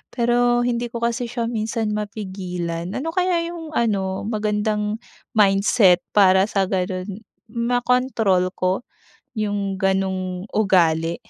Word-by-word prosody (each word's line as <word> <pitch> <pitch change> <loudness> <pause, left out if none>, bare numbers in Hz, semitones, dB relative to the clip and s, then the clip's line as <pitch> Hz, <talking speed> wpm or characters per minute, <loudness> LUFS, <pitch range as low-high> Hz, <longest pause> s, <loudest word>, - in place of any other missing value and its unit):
Pero 240 0 +2
hindi 240 0 -1
ko 235 0 -6
kasi 235 +1 0
siya 235 0 -3
minsan 220 -1 -2
mapigilan. 185 -5 -4
Ano 320 +5 -2
kaya 360 -1 +1
'yung 325 -3 -8
ano 195 -5 0
magandang 210 0 -1 0.4
mindset, 195 -2 +4 0.2
para 190 -1 +5
sa 200 -3 +1
ganun 185 +1 -2 0.3
makontrol 235 -5 +1
ko 185 +1 0 0.6
'yung 200 -2 -2
ganong 190 -1 -1
ugali? 170 -5 +2
210 Hz, 110 wpm, -22 LUFS, 190-235 Hz, 0.6 s, para